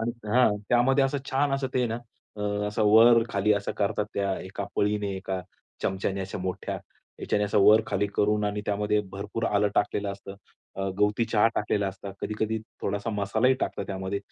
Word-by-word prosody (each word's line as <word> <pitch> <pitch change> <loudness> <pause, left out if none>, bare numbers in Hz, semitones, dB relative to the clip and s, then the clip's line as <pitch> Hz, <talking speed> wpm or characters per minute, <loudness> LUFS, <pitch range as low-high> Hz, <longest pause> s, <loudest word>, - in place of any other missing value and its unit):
आणि 115 +1 -1 0.2
हं, 115 -2 +4
त्यामध्ये 135 +3 +4
असं 140 +1 0
छान 140 +1 +1
असं 135 -1 -1
ते - - +2
आहे - - +1
ना 115 +1 -3 0.7
असं 105 +1 -1
वर-खाली 115 -2 +5
असं 100 -1 -1
करतात, 105 0 0
त्या 100 -1 0
एका 95 +2 -5
पळीने, 105 0 +1
एका 95 0 -3 0.4
चमच्याने 95 +1 -1
अशा 95 +1 -5
मोठ्या 90 0 -4 0.4
याच्याने 105 - 0
असं 105 0 +1
वर-खाली 105 0 +4
करून 105 0 +2
आणि 105 0 -1
त्यामध्ये 105 +1 +1
भरपूर 105 +3 -4
आलं 105 -1 +2
टाकलेलं 100 0 0
असतं, 100 0 -10 0.4
अ, 95 0 -2
गवती 105 +3 +2
चहा 110 -1 +3
टाकलेला 105 -1 0
असता. 95 +1 -8
कधी-कधी 110 +1 -2 0.2
थोडासा 100 +3 -2
मसालाही 110 +5 +2
टाकतात - - -2
त्यामध्ये. 95 +1 -3
105 Hz, 170 wpm, -27 LUFS, 100-110 Hz, 0.7 s, वर-खाली